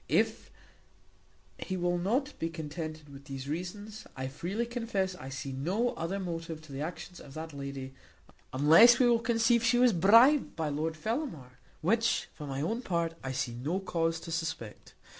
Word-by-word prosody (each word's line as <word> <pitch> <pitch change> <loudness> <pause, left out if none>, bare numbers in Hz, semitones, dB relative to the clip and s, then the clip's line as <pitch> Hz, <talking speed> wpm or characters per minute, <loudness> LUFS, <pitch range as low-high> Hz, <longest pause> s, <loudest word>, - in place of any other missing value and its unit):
If - - +1 1.1
he 185 - -3
will 175 0 0
not 255 +11 0
be 165 - -1
contented 155 -2 -6
with 140 0 -12
these 135 -1 -6
reasons, 205 +7 -5
I 130 0 -3
freely 175 - -3
confess 230 -6 -2
I 135 -7 -9
see 135 0 -5
no 180 - 0
other 170 +2 -3
motive 165 -3 -4
to 155 - -13
the 135 +1 -5
actions 175 +2 -6
of 140 - -12
that 160 0 -6
lady, 140 -1 -6 0.6
unless 165 - +7
we 250 - +4
will 235 -1 +4
conceive 230 0 +2
she 230 +1 +4
was 245 -2 +5
bribed 230 - +6
by 160 -2 -1
Lord 155 +2 -2
Fellamar, 160 - -4 0.2
which 225 +8 +1
for 150 -2 -8
my 135 0 -3
own 225 +10 -1
part 170 -6 -1
I 135 - -3
see 130 -2 -2
no 145 +10 -2
cause 165 -3 -1
to 165 - -8
suspect. 160 -10 -5
165 Hz, 175 wpm, -30 LUFS, 145-215 Hz, 1.1 s, unless